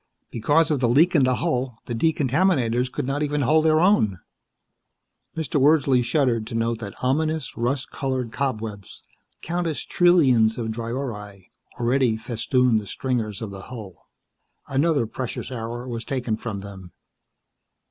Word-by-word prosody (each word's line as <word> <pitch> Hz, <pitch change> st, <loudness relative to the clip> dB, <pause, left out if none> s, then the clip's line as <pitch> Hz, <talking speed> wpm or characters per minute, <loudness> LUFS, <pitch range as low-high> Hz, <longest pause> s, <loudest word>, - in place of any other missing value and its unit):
Because 150 Hz, +8 st, +2 dB
of 145 Hz, -, +1 dB
the 120 Hz, -2 st, +2 dB
leak 160 Hz, +9 st, +4 dB
in 145 Hz, -6 st, +4 dB
the 130 Hz, 0 st, +2 dB
hull, 130 Hz, -7 st, -2 dB
the 120 Hz, -, -4 dB
decontaminators 130 Hz, -3 st, +1 dB
could -, -, -3 dB
not 140 Hz, +2 st, -2 dB
even 150 Hz, 0 st, 0 dB
hold 155 Hz, +4 st, +3 dB
their 155 Hz, 0 st, +4 dB
own. 160 Hz, -, +3 dB, 1.2 s
Mr. 150 Hz, -2 st, 0 dB
Wordsley 140 Hz, -3 st, +4 dB
shuddered 120 Hz, -5 st, +1 dB
to 115 Hz, -, -6 dB
note 115 Hz, 0 st, 0 dB
that 100 Hz, -4 st, -7 dB
ominous, 155 Hz, +2 st, 0 dB
rust 125 Hz, +3 st, -2 dB
colored 130 Hz, -4 st, -2 dB
cobwebs 110 Hz, -7 st, -4 dB, 0.4 s
countless 170 Hz, -4 st, -2 dB
trillions 130 Hz, -11 st, +4 dB
of 115 Hz, -2 st, -3 dB
dryori 110 Hz, -5 st, -6 dB, 0.3 s
already 120 Hz, -1 st, +2 dB
festooned 115 Hz, +1 st, +1 dB
the 105 Hz, -, -9 dB
stringers 115 Hz, -6 st, -2 dB
of 105 Hz, -, -6 dB
the 95 Hz, -1 st, -8 dB
hull. 110 Hz, -7 st, -10 dB, 0.6 s
Another 140 Hz, -1 st, +1 dB
precious 125 Hz, +3 st, -5 dB
hour 120 Hz, +1 st, -5 dB
was 115 Hz, -2 st, -4 dB
taken 125 Hz, -4 st, -2 dB
from 110 Hz, -3 st, -5 dB
them. 95 Hz, -3 st, -11 dB
125 Hz, 145 wpm, -23 LUFS, 115-145 Hz, 1.2 s, leak